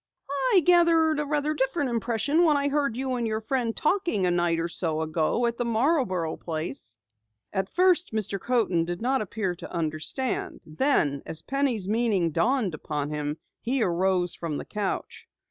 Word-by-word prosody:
"I 370 - +7
gathered 330 -3 +5
a 300 0 0
different 270 -1 0
impression 235 - +1
when 305 -4 +4
I 285 0 +1
heard 280 -5 0
you 260 0 -1
and 235 -1 -1
your 220 0 -1
friend 230 0 -1
talking 325 - +1
a 180 - +2
night 175 -1 +1
or 165 - -1
so 160 -2 -1
ago 160 +8 0
at 235 0 -2
the - - +2
Marborough 230 - +1
place." 155 -8 -4 0.6
At 190 -1 -1
first 360 -1 +3
Mr. 210 -2 -1
Coaten 225 -9 +1
did 175 +1 -4
not 260 +3 +1
appear 205 -2 -2
to 175 - -10
understand, 165 - -2
then 155 - +1
as 160 0 -4
Penny's 265 -8 -1
meaning 210 -6 +1
dawned 215 - +1
upon 150 -1 -4
him, 150 0 -3 0.2
he 250 +1 0
arose 180 0 +1
from 160 -4 -4
the - - -6
couch. 205 -2 -4
220 Hz, 165 wpm, -26 LUFS, 170-275 Hz, 0.6 s, I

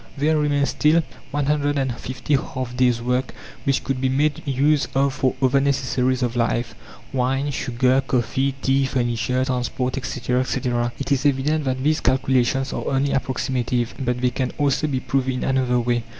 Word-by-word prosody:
There 155 +3 +2
remain 145 -2 +2
still 155 +4 +3 0.3
150 140 -2 -1
half 130 -2 -3
days' 125 -2 +2
work 125 +2 -1 0.3
which 135 -1 +1
could 135 -2 -2
be 130 - +2
made 145 +3 +1
use 140 +2 +2
of 135 0 +2
for 130 -2 0
other 130 +1 +4
necessaries 130 -2 +1
of 120 -1 -1
life 120 0 0 0.4
wine, 135 +2 0
sugar, 130 0 +1
coffee, 130 +3 0
tea, 135 0 +2
furniture, 125 0 0
transport, 125 0 -2
etc., 125 -1 -1
etc. 120 -2 -1
It 140 +1 -4
is 135 -2 +2
evident 145 +2 +1
that 130 0 -1
these 155 +2 +2
calculations 130 +1 +1
are - - -4
only 135 +1 +1
approximative, 125 -2 -1
but 125 -2 -1
they 125 -1 +2
can 130 +1 -1
also 145 +1 +1
be 135 -3 -1
proved 130 0 -1
in 130 -1 -2
another 130 -2 +1
way. 120 0 0
130 Hz, 165 wpm, -22 LUFS, 125-140 Hz, 0.4 s, other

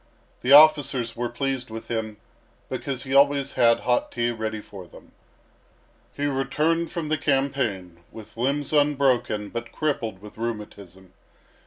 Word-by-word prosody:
The 125 - 0
officers 140 -5 +6
were 120 0 -2
pleased 130 0 -3
with 115 0 -8
him, 110 -2 -4 0.5
because 130 -2 -4
he 135 -1 -5
always 140 0 +3
had 115 -1 +3
hot 120 0 0
tea 120 0 -1
ready 110 -1 -4
for 95 -3 -11
them. - - -17 1.1
He 145 - -1
returned 150 +5 0
from 165 -3 -4
the 155 -1 0
campaign 130 - -1
with 110 0 -12
limbs 140 +5 -1
unbroken 135 -8 +1
but 115 0 -6
crippled 120 -10 -2
with 105 +2 -13
rheumatism. 100 -5 -7
125 Hz, 140 wpm, -24 LUFS, 110-140 Hz, 1.1 s, officers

